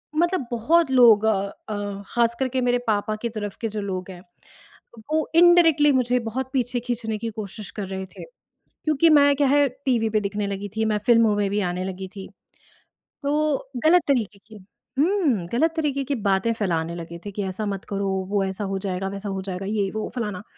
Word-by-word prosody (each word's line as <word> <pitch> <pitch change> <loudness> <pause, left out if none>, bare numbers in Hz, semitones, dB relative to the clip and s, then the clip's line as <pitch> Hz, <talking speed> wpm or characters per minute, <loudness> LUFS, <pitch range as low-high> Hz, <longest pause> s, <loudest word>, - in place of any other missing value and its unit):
मतलब 340 -5 +1
बहुत 295 +7 +2
लोग 235 -5 +6
अ 220 -2 +3 0.3
अ, 205 -1 -4
खास 235 0 +1
करके 260 -1 0
मेरे 245 0 +2
पापा 215 0 0
के 235 - 0
तरफ 210 -3 -5
के 225 - 0
जो 210 0 -4
लोग 190 -1 -4
हैं, 175 - -11 0.9
वो 315 0 +1
इंडायरेक्टली 335 -4 +6
मुझे 250 -1 +2
बहुत 245 +3 -4
पीछे 245 -2 0
खींचने 230 -2 -3
की 230 - -3
कोशिश 210 -1 -7
कर 200 -3 -5
रहे 190 0 -5
थे। 185 - -12 0.6
क्योंकि 310 +2 +4
मैं 285 -1 +6
क्या 280 -1 +2
है 285 +1 +4 0.2
टीवी 230 -4 +2
पे 215 - +1
दिखने 205 0 -2
लगी 200 +1 -4
थी, 220 - +1
मैं 215 -1 +1
फिल्मों 230 -3 +5
में 200 -1 +1
भी 205 +1 0
आने 180 +1 -3
लगी 190 0 -5
थी। 195 -1 -7 1.0
तो 290 -2 0
गलत 355 +3 +6
तरीके 215 -7 0
की 220 - -13 0.4
हुँ, 300 - +2
गलत 320 +7 +2
तरीके 290 -4 -1
की 280 +1 -1
बातें 200 -1 +1
फैलाने 170 -6 -2
लगे 170 0 -8
थे 205 - -5
कि 200 +1 -4
ऐसा 190 +3 -3
मत 195 -1 -4
करो, 200 0 -2 0.2
वो 200 -1 +1
ऐसा 190 +2 -4
हो 195 0 -2
जाएगा, 190 -1 -3
वैसा 200 +1 -6
हो 195 -1 -3
जाएगा, 190 0 -5
ये 205 -1 -1
वो 220 0 -4
फलाना। 210 -5 -3
220 Hz, 200 wpm, -23 LUFS, 200-265 Hz, 1.0 s, लोग